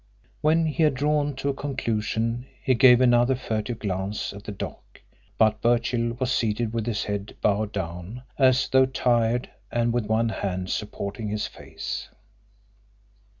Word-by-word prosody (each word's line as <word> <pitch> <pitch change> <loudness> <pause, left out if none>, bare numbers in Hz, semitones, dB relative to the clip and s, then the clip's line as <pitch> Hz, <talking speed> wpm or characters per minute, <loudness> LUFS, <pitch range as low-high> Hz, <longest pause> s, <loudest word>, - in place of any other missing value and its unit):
When 160 +2 +3
he 160 +1 -1
had 150 -3 +4
drawn 145 +1 +1
to 135 +2 -2
a - - +1
conclusion 115 -3 -2 0.2
he 130 - +3
gave 125 0 +7
another 120 +1 +4
furtive 115 -1 -3
glance 100 0 -3
at 100 +1 -11
the - - -4
dock, 100 - -8 0.4
but 110 -1 +3
Birchill 120 0 +1
was 130 0 -1
seated 115 -1 0
with 115 -1 -2
his 110 -3 -1
head 100 0 -4
bowed 105 0 +1
down, 95 +5 -5
as 130 -1 +4
though 130 0 +4
tired, 120 -2 +1 0.2
and 120 0 +1
with 120 -3 0
one 110 +1 +2
hand 95 -3 -3
supporting 105 +1 -4
his 105 0 -1
face. - - -6
115 Hz, 150 wpm, -25 LUFS, 105-130 Hz, 0.4 s, gave